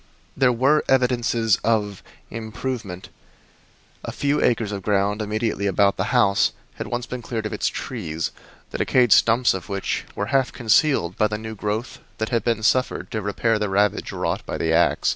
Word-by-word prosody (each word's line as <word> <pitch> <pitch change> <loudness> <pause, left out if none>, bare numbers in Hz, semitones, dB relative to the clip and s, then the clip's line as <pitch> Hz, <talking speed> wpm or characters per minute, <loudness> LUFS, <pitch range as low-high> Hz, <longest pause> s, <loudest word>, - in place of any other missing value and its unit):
There 130 -2 +3
were 135 +6 +3
evidences 120 -4 +2
of 105 -4 0 0.3
"improvement" 110 -3 -5 0.9
a - - -5
few 145 +1 0
acres 115 -3 +1
of 100 -1 -4
ground 100 +1 0
immediately 110 -1 -1
about 100 +1 +3
the - - 0
house 105 -6 +3 0.2
had - - -5
once 120 0 -3
been 125 -1 -6
cleared 115 -1 -4
of 110 - -3
its - - -1
trees, 80 0 -4 0.4
the - - -5
decayed 125 -4 +4
stumps 115 +2 +4
of 95 0 -6
which 100 -1 -2
were 105 +3 -3
half 135 -2 +2
concealed 115 - +2
by 105 - +3
the 105 0 -3
new 110 0 -7
growth 105 +3 -4 0.2
that 110 - -2
had 115 -2 0
been 115 -2 0
suffered 125 +3 +1
to 110 - -2
repair 105 +2 0
the 105 -1 -1
ravage 100 +1 +1
wrought - - -2
by - - -5
the 80 0 0
ax. 85 +1 +3
110 Hz, 180 wpm, -23 LUFS, 100-120 Hz, 0.9 s, decayed